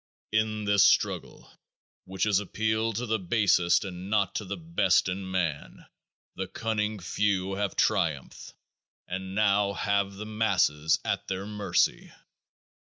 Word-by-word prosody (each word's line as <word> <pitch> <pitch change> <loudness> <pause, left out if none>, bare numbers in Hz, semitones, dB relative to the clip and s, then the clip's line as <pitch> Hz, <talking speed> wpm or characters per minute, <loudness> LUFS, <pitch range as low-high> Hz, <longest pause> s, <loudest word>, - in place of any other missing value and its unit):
In 110 0 0
this 100 -1 +4
struggle 105 - +1 0.6
which 95 0 -3
has 105 -2 +3
appealed 110 +2 -1
to 125 - -2
the 110 -1 0
basest 90 -2 +2
and 90 0 -7
not 100 -2 +1
to 105 - -3
the 95 - -5
best 160 - +2
in 95 +1 -4
man 85 -6 -3 0.5
the 95 0 -4
cunning 110 +1 -2
few 95 +1 -1
have 100 -1 -2
triumphed - - -1 0.5
and 95 +1 -5
now 100 -1 +2
have 100 0 0
the 105 +2 -7
masses 95 -9 +1
at - - -2
their 95 +1 -3
mercy. 105 -1 0
100 Hz, 135 wpm, -28 LUFS, 95-105 Hz, 0.6 s, this